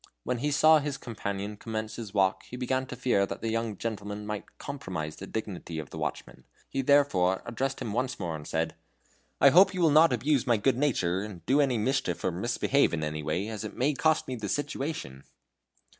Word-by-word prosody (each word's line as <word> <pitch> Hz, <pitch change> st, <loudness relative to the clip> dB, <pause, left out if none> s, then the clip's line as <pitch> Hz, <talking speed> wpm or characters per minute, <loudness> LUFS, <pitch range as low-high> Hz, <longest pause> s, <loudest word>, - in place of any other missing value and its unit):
When 125 Hz, -, -2 dB
he 145 Hz, +4 st, 0 dB
saw 155 Hz, +2 st, +6 dB
his 145 Hz, -1 st, -3 dB
companion 105 Hz, -4 st, -5 dB
commence 110 Hz, 0 st, -4 dB
his 110 Hz, -4 st, -6 dB
walk 95 Hz, -2 st, +2 dB
he 125 Hz, -, -7 dB
began 130 Hz, +1 st, -1 dB
to 125 Hz, -, -6 dB
fear 120 Hz, -6 st, +2 dB
that -, -, -6 dB
the 115 Hz, -, 0 dB
young 115 Hz, -2 st, -2 dB
gentleman 105 Hz, -1 st, -4 dB
might 105 Hz, -1 st, -6 dB
compromise 90 Hz, -, -5 dB
the 95 Hz, -, -8 dB
dignity 95 Hz, -6 st, -5 dB
of 75 Hz, -3 st, -6 dB
the -, -, -7 dB
watchman. -, -, -5 dB, 0.2 s
He 135 Hz, -, -2 dB
therefore 125 Hz, -10 st, +3 dB
addressed 135 Hz, +3 st, -2 dB
him 105 Hz, -, -4 dB
once 130 Hz, +2 st, -1 dB
more, 85 Hz, -4 st, -3 dB
and 75 Hz, -1 st, -8 dB
said: 80 Hz, 0 st, -1 dB, 0.7 s
"I 140 Hz, -, +8 dB
hope 185 Hz, +6 st, +6 dB
you 180 Hz, -, -1 dB
will 160 Hz, -3 st, +5 dB
not 155 Hz, +1 st, +6 dB
abuse 130 Hz, +2 st, +1 dB
my 120 Hz, -2 st, +4 dB
good 125 Hz, +5 st, +2 dB
nature 95 Hz, -11 st, +1 dB
and 100 Hz, -5 st, -8 dB
do 140 Hz, +4 st, +4 dB
any 130 Hz, -4 st, +2 dB
mischief 110 Hz, -6 st, 0 dB
or 95 Hz, -, +1 dB
misbehave 120 Hz, +5 st, +1 dB
in 80 Hz, -, -3 dB
any 75 Hz, 0 st, -3 dB
way, 80 Hz, +7 st, -1 dB
as 110 Hz, -1 st, -5 dB
it 110 Hz, -, -6 dB
may 140 Hz, +4 st, +2 dB
cost 155 Hz, +2 st, +2 dB
me 130 Hz, -, -3 dB
the 105 Hz, -4 st, -5 dB
situation." 140 Hz, -, -3 dB
115 Hz, 210 wpm, -28 LUFS, 95-135 Hz, 0.7 s, I